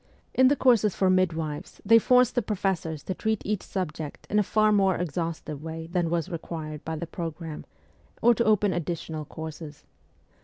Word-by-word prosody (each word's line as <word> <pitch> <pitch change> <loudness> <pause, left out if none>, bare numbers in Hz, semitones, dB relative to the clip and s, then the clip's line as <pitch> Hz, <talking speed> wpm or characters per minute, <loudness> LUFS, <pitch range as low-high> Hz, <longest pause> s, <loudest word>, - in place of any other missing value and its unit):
In 260 0 +5
the 285 - +4
courses 230 -7 +3
for 190 -1 +3
midwives 165 -5 -1
they 230 +3 +7
forced 250 +1 +4
the 245 - +2
professors 190 -7 -2
to 185 - -3
treat 220 +2 -1
each 210 -1 -1
subject 160 -5 -5
in 210 - +3
a - - +5
far 215 +1 +3
more 195 -3 +3
exhaustive 165 -3 -3
way 160 0 -6
than 175 -2 +1
was 170 0 0
required 160 -3 -6
by 160 - -3
the 160 - -4
programme, 165 -2 -6 0.5
or 240 - +5
to 235 - +1
open 210 -3 +3
additional 160 -2 -4
courses. 160 -1 -8
175 Hz, 175 wpm, -27 LUFS, 160-210 Hz, 0.5 s, they